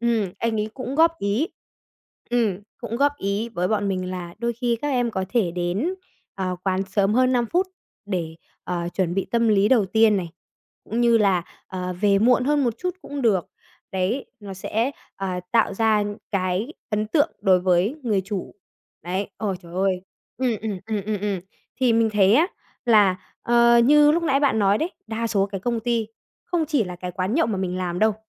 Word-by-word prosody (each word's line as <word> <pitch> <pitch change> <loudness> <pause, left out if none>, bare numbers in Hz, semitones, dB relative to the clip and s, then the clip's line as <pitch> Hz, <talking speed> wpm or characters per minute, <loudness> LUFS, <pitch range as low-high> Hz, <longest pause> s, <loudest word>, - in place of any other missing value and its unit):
ừm, 225 -6 +1
anh 225 -2 0
ấy 215 +1 -3
cũng 260 0 -5
góp 330 +2 +4
ý 210 - 0 0.8
ừm, 220 -6 +1 0.2
cũng 235 -1 -4
góp 285 +2 +3
ý 200 +4 -1
với 180 -5 -1
bọn 205 -2 0
mình 185 -1 -2
là 175 -2 -6
đôi 235 +1 -1
khi 235 0 -1
các 290 - 0
em 245 -4 +1
có 190 -2 -2
thể 225 -8 +1
đến, 180 - -1 0.4
ờ, 185 -2 -2
quán 190 0 +1
sớm 195 +2 +1
hơn 255 0 +4
5 240 -2 +2
phút 365 - +1 0.4
để, 170 -5 -3 0.3
ờ, 175 -1 -2
chuẩn 180 -2 0
bị 195 - -1
tâm 235 -1 +2
lý 205 0 +4
đầu 225 -7 +4
tiên 220 +1 +4
này, 175 -3 -3 0.5
cũng 230 +3 -2
như 235 -1 +5
là, 190 -4 +3 0.3
ờ, 180 -1 -4
về 200 -1 +4
muộn 250 +3 +4
hơn 290 0 +2
một 235 -2 0
chút 360 0 -3
cũng 285 -2 -5
được. 195 -7 +2 0.4
Đấy, 190 +8 -1
nó 195 -2 -7
sẽ, 225 +7 -1 0.3
ờ, 185 -2 -3
tạo 225 -4 +3
ra 215 -1 +2 0.3
cái 190 +7 -1 0.2
ấn 210 0 0
tượng 295 +7 +2
đối 190 -3 +4
với 185 - +2
người 210 -5 +1
chủ. 195 -2 -5 0.5
Đấy, 185 +4 -3
ôi, 200 -4 -2
trời 170 0 -12
ơi! 185 -1 0 0.4
Ừm, 255 -2 +1
ừm, 210 -4 -3
ừm, 215 -3 -2
ừm, 210 -2 -2
ừm. 200 -3 -1 0.4
Thì 250 -3 +4
mình 225 -1 +3
thấy 200 0 +5
á 325 +6 +5 0.4
là, 205 -6 +5 0.3
ờ, 235 0 +5
như 295 +2 +6
lúc 335 +1 +1
nãy 275 -3 +2
bạn 275 -6 +2
nói 200 0 +3
đấy, 340 +3 -1 0.2
đa 225 +1 -2
số 200 -3 +1
cái 195 -2 -6
công 235 +1 -1
ty 230 -1 0 0.4
không 335 -3 -1
chỉ 280 -9 +2
là 180 -1 -7
cái 180 0 -5
quán 185 +6 -2
nhậu 330 - +3
mà 220 - -1
mình 180 -1 -2
làm 180 -1 -2
đâu, 220 -1 +3
215 Hz, 205 wpm, -23 LUFS, 190-240 Hz, 0.8 s, như